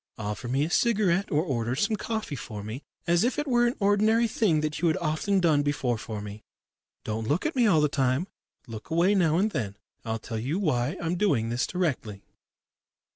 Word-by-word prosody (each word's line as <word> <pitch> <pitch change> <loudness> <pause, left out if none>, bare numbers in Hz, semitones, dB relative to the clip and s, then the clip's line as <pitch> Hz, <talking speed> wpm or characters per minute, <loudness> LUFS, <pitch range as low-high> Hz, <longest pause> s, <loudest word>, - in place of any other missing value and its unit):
Offer 105 +2 -4
me 135 +4 +1
a - - -4
cigarette 200 -5 +2
or 150 +1 +2
order 120 -6 -1
some 215 - +1
coffee 220 -8 -4
for 105 -5 -7
me, 110 +6 -6 0.2
as 170 0 +3
if 250 +5 0
it 295 - -1
were 240 -2 +3
an 240 - -1
ordinary 215 +3 +3
thing 195 -9 +1
that 155 0 -2
you 175 - +3
had 160 - +2
often 175 +4 0
done 160 -5 +3
before 140 -5 -1
for 110 -2 -6
me. 105 +1 -8 0.6
Don't 110 +1 -3
look 150 +7 0
at 315 - -1
me 245 -3 +4
all 165 -7 +4
the 150 - +4
time 135 +2 0 0.4
look 115 0 -9
away 170 +5 +3
now 165 -5 +3
and 210 +4 +2
then. 100 - -3 0.3
I'll 115 -1 -2
tell 110 0 -5
you 135 +10 -2
why 135 -11 0
I'm 170 +1 -2
doing 140 - +1
this 120 +2 0
directly." 135 - -2
155 Hz, 205 wpm, -27 LUFS, 120-200 Hz, 0.6 s, me